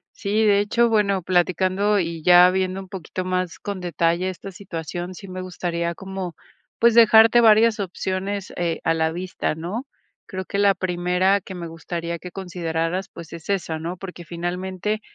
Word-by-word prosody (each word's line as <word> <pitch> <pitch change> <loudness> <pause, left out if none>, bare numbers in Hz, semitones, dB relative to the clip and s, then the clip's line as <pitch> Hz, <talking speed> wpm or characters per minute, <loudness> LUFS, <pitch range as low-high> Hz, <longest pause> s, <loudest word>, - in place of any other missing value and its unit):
Sí, 210 +2 0
de 200 -1 +4
hecho, 235 +3 +2
bueno, 200 -4 +2
platicando 185 +3 +2
y 165 -2 -3
ya 180 +1 +7
viendo 185 0 -1
un 190 - -11
poquito 185 0 -5
más 185 -1 -2
con 200 -2 -5
detalle 170 0 0
esta 185 +1 -7
situación, 175 -1 -6
sí 195 +2 -10
me 185 0 -6
gustaría 170 -2 -3
como, 190 -1 -6 0.4
pues, 235 -1 +5
dejarte 225 0 +7
varias 225 0 +5
opciones, 190 +1 -3
eh, 170 -2 -1
a 165 - +3
la 160 0 0
vista, 180 -2 -3
¿no? 185 - -5 0.4
Creo 185 -1 -5
que 200 - -4
la 200 -1 +4
primera 180 +2 +1
que 190 +1 -9
me 170 -2 -6
gustaría 170 +1 -5
que 180 +2 -10
consideraras, 175 -1 -3
pues, 170 -3 -11
es 170 +1 -9
esa, 180 -5 -1
¿no? 170 +3 -5
Porque, 180 -2 -9
finalmente, 185 +5 -3
185 Hz, 170 wpm, -23 LUFS, 170-200 Hz, 0.4 s, ya